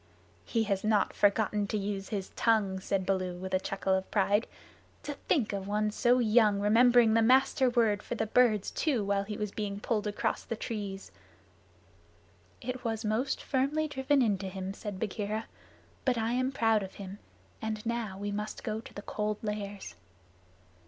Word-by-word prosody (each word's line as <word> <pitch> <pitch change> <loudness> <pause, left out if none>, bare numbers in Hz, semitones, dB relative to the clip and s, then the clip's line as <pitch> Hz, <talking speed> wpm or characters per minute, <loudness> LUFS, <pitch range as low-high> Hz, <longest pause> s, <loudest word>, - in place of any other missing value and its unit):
"He 230 -2 +1
has 200 -3 -1
not 215 -2 +2
forgotten 205 0 +2
to 215 - -1
use 195 -1 -3
his 195 -3 -3
tongue," 210 -5 +2
said 190 0 -1
Baloo 185 -2 -1
with 190 +1 -6
a 185 - +3
chuckle 195 0 -1
of 190 0 -1
pride. 205 +2 +2 0.6
"To 295 - -4
think 230 -9 +2
of 195 -1 -4
one 210 +1 0
so 245 +3 +3
young 215 -3 +4
remembering 230 +2 +5
the 225 - +4
Master 260 +2 +4
Word 225 -4 +2
for 240 - -5
the 220 - -1
birds 220 -3 +3
too 265 -9 0
while 200 0 0
he 210 0 -5
was 210 -2 -3
being 200 -1 -4
pulled 215 -1 -1
across 210 - -2
trees!" 200 -3 -5 1.5
"It 255 +1 -5
was 225 -1 -2
most 220 +6 0
firmly 285 +4 0
driven 275 -1 +2
into 200 -4 0
him," 190 0 -5
said 205 -2 -6
Bagheera. 215 +1 -2 0.6
"But 255 -3 +1
I 225 0 0
am 255 +2 +1
proud 225 -4 +2
of 190 -1 -7
him, 195 0 -8 0.4
and 215 0 -3
now 230 -4 -2
we 205 +1 -3
must 210 +1 -4
go 220 -1 -3
to - - -13
the 205 - -7
Cold 210 0 -2
Lairs." 205 - -4
210 Hz, 170 wpm, -30 LUFS, 200-230 Hz, 1.5 s, remembering